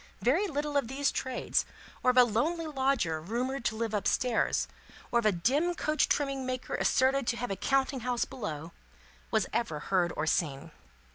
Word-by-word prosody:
Very 320 - +3
little 295 -2 -1
of 275 - +1
these 275 +3 0
trades, 260 -1 0 0.4
or 255 - +3
of 250 - +2
a 250 - +10
lonely 295 +9 0
lodger 265 - 0
rumoured 245 - -2
to 220 - +1
live 225 -1 -2
up 210 - 0
stairs, 250 -2 +1 0.4
or 240 - +4
of 225 - +2
a - - +5
dim 280 - +1
coach 305 -2 +1
trimming 275 -2 0
maker 255 0 -4
asserted 265 0 +2
to 235 - +1
have 245 -2 -3
a - - 0
counting 270 +5 +1
house 245 0 0
below, 170 - -6 0.6
was - - +2
ever 215 -11 -1
heard 180 -3 +3
or 155 - 0
seen. 160 -1 -1
250 Hz, 185 wpm, -30 LUFS, 210-275 Hz, 0.6 s, a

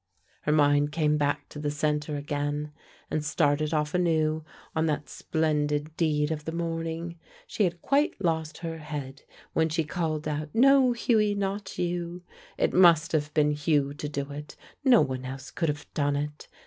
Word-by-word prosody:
Her 150 - 0
mind 145 -1 +4
came 150 -1 +2
back 145 0 0
to 150 - -8
the 150 0 -1
center 150 0 -1
again, 145 +1 -2 0.4
and 155 - 0
started 150 0 +1
off 150 -1 0
anew 160 -3 +1 0.3
on 160 0 +2
that 150 -1 -1
splendid 150 -1 -1
deed 150 -2 +1
of 150 -2 -4
the 160 - -3
morning. 165 0 -3 0.3
She 210 - +1
had 170 -1 -3
quite 285 +2 +2
lost 160 -4 -1
her 165 -1 -4
head 145 -3 -6 0.3
when 160 0 +2
she 160 +1 0
called 155 -1 -2
out, 150 0 -2
"No, 265 +1 +6
Hughie, 215 -3 +2
not 200 0 -3
you!" 175 0 -2 0.3
It - - +1
must 170 -3 +6
have 150 -2 0
been 150 -1 +4
Hugh 145 -1 +1
to 145 0 -5
do 140 -1 -4
it, 150 +1 -8 0.3
no 255 -4 +6
one 130 -1 -2
else 130 +1 -7
could 165 -2 -1
have 145 +1 -3
done 145 -1 +1
it. 150 +1 -4
155 Hz, 175 wpm, -27 LUFS, 150-170 Hz, 0.4 s, No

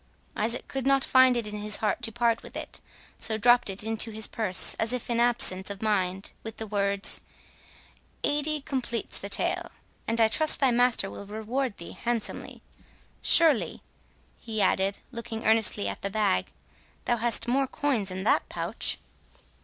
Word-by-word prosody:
Isaac 230 +3 -1
could 270 -1 -3
not 275 0 +3
find 260 -1 +5
in 235 - -2 0.2
his 210 0 +1
heart 215 +2 -1
to 230 -1 -1
part 235 0 +1
with - - -10
it, - - -7 0.4
so 220 -1 +1
dropt 240 0 +4
it 195 +2 -2
into 225 +1 -1
his 220 0 +2
purse 200 -5 +4
as 225 +2 0
if 250 -1 -4
in 235 - +1
absence 230 -6 +1
of 200 -1 -6
mind, 195 -3 -1
with 225 -1 -8
the 220 - -5
words, 200 -1 +1 1.0
"Eighty 295 +1 0
completes 245 -5 -3
the 200 - -6
tale, 345 - +1 0.4
and 230 +1 0
I 225 - +6
trust 310 +8 +1
thy 270 -3 +3
master 245 -4 +3
will 200 - -9
reward 220 +3 -3
thee 170 - -8
handsomely.—Surely," 240 +5 -1 0.6
he 220 -2 -5
added, 195 0 +2
looking 230 -2 -6
earnestly 220 - +3
at 100 - -5
the 200 - -2
bag, 195 - +1 0.6
"thou 240 - +1
hast 235 0 +2
more 270 +2 +1
coins 255 -9 -1
in 185 +1 -4
that - - +2
pouch?" - - -3
225 Hz, 160 wpm, -27 LUFS, 205-245 Hz, 1.0 s, I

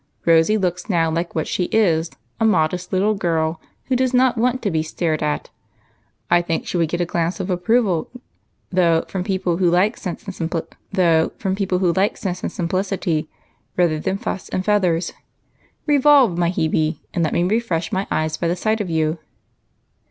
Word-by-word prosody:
" - - -40
Rosy 165 +6 +4
looks 180 -1 -2
now 165 -4 +2
like 170 +2 -3
what 160 - -1
she 180 - -1
is, 170 -6 +2 0.3
a - - +1
modest 180 -3 +1
little 200 +3 +2
girl, 165 -4 -1 0.2
who 260 - 0
does 255 0 +1
not 255 0 +4
want 250 +2 +1
to 200 - 0
be 160 -1 +1
stared 155 0 -2
at. 150 0 -2 0.8
I 175 0 +4
think 165 -1 -2
she - - -5
would 165 -2 +1
get 175 +1 -1
a - - +1
glance 170 +2 -1
of 190 0 -2
approval, 180 -1 +1 0.6
though, 170 -3 +3
from 185 -2 -3
people 190 -3 -1
who 180 -1 +3
like 185 +6 +2
sense 180 -4 -6
and 195 - -6 2.2
simplicity, 180 -3 -1 0.5
rather 170 -4 +2
than 190 +5 -1
fuss 195 - -5
and 185 - -2
feathers. 185 -5 +1 0.7
Revolve, 285 - +5
my 170 -1 +1
Hebe, 160 -2 0 0.2
and 170 - 0
let 155 - 0
me 175 - +2
refresh 185 -4 0
my 190 +1 -1
eyes 155 0 -1
by 170 - -1
the 170 - +1
sight 215 +4 0
of 190 - -4
you." 160 0 0
180 Hz, 165 wpm, -21 LUFS, 165-200 Hz, 2.2 s, Revolve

